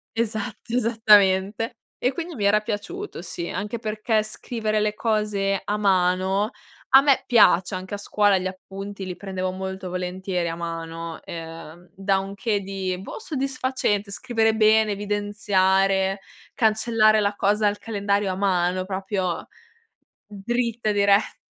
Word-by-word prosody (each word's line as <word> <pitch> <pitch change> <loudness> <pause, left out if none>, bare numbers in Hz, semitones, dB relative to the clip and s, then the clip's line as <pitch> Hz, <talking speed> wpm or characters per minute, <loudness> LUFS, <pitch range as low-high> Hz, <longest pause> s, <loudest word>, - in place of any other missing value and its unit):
Esatto, 225 0 -3
esattamente. 215 -2 +3 0.2
E 250 - +1
quindi 340 +2 -5
mi 205 -5 -2
era 210 +1 +4
piaciuto 215 - -5
sì, 170 0 -5
anche 210 +5 -4
perché 215 0 0
scrivere 215 0 -2
le 210 0 +1
cose 210 -3 0
a 205 +1 -1
mano 190 +1 +2 0.4
a 270 - +8
me 275 -1 +3
piace. 190 -6 +5
Anche 185 +2 -5
a - - -5
scuola 205 -1 +2
gli 185 - -4
appunti 195 +1 -8
li 180 -1 -5
prendevo 185 -1 -3
molto 190 0 -5
volentieri 180 0 -3
a 165 - -3
mano, 165 -1 -6
ehm, 165 +1 -9
da 195 0 +1
un 195 +1 -6
che 210 0 0
di, 190 -1 -3
boh, 195 - -8
soddisfacente, 260 - -1
scrivere 225 0 +1
bene, 220 0 +4
evidenziare, 195 -1 +1 0.3
cancellare 220 -2 +3
la 205 -1 0
cosa 210 +2 +1
al 205 0 0
calendario 200 -2 -1
a - - -3
mano, 185 -1 +1
proprio 190 -2 -3 0.8
dritta, 230 +2 -2
diretta. 200 0 +3
200 Hz, 135 wpm, -24 LUFS, 190-215 Hz, 0.8 s, a